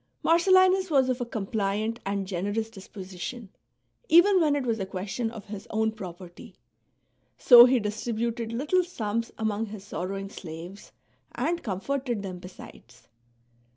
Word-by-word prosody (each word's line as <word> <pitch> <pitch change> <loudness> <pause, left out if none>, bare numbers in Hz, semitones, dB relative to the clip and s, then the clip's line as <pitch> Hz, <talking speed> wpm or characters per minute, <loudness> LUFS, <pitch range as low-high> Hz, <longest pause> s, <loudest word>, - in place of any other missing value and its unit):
Mar 330 - +5
cellinus 375 +1 +4
was 270 -4 +3
of 250 0 -1
a 245 - -3
compliant 215 +1 -2
and 200 0 -1
generous 205 +4 -3
disposition, 195 +2 -8 0.6
even 360 +3 +6
when 300 -3 +3
it 280 -3 -2
was 230 -2 -1
a 195 - -2
question 195 +5 -3
of 225 -3 -10
his 205 -1 -8
own 220 0 0
propert}'; 180 -4 -10 0.8
so 240 -2 +9
he 255 0 +3
distributed 225 +2 -3
little 295 +10 +1
sums 230 - -3
among 220 0 -1
his 205 -2 -9
sorrowing 195 0 -5
slaves, 175 +3 -9 0.4
and 330 +7 -1
comforted 240 +2 -3
them 185 -2 -6
besides. 180 +1 -14
220 Hz, 140 wpm, -27 LUFS, 195-255 Hz, 0.8 s, so